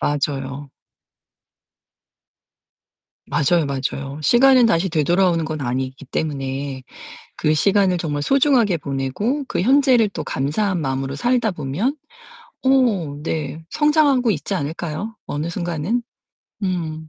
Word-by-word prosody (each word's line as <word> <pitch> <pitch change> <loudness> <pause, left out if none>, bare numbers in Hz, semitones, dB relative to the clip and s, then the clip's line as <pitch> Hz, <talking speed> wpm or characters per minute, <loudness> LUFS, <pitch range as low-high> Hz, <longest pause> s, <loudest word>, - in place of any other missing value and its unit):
맞아요. 140 -1 -2 2.6
맞아요, 150 +2 +2
맞아요. 140 +1 -4
시간은 250 - +6
다시 190 -4 +2
되돌아오는 170 +1 +2
건 155 -1 -4
아니기 130 +1 -3
때문에 135 -2 -3 0.5
그 150 - +1
시간을 190 +1 +3
정말 150 -4 -2
소중하게 250 - +3
보내고 140 - -2
그 - - -1
현재를 255 0 +4
또 - - -5
감사한 175 +7 -1
마음으로 135 -1 -2
살다 240 - +1
보면 175 - -2 0.7
어 230 - +2
네 155 -1 -3
성장하고 295 -5 +3
있지 150 -6 -3
않을까요? 165 +8 -4
어느 150 +3 -3
순간은? 175 +6 -2 0.6
음. 160 -4 -3
165 Hz, 255 characters per minute, -21 LUFS, 140-220 Hz, 2.6 s, 시간은